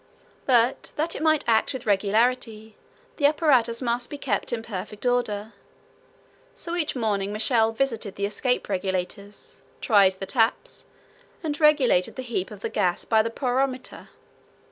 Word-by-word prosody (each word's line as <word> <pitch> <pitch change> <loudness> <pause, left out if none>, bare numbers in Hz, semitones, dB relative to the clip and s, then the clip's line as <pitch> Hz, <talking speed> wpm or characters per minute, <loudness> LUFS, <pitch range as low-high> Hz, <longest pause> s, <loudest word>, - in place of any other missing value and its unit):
But 245 0 +2
that 320 +3 -1
it - - -5
might 315 -1 +2
act 225 +2 +2
with 260 -1 -6
regularity, 220 +2 0 0.4
the 285 - +5
apparatus 260 -6 +2
must 240 0 0
be 290 - -6
kept 275 - -2
in 230 -2 -3
perfect 210 +1 -7
order; 225 -3 0 1.0
so 340 0 -4
each 325 -5 -1
morning 205 -4 -1
Michel 220 +1 +2
visited 225 -4 -2
the 200 - -1
escape 250 +5 -1
regulators, 195 +1 -4 0.2
tried 200 -4 +4
the 190 +1 -7
taps, 225 +1 0 0.6
and 295 -2 -3
regulated 285 -12 +4
the 260 - -5
heat 230 -7 -3
of 210 -2 -11
the - - -2
gas 175 -1 0
by 220 -1 +4
the 225 - -2
pyrometer. 255 +1 -2
230 Hz, 145 wpm, -25 LUFS, 205-260 Hz, 1.0 s, the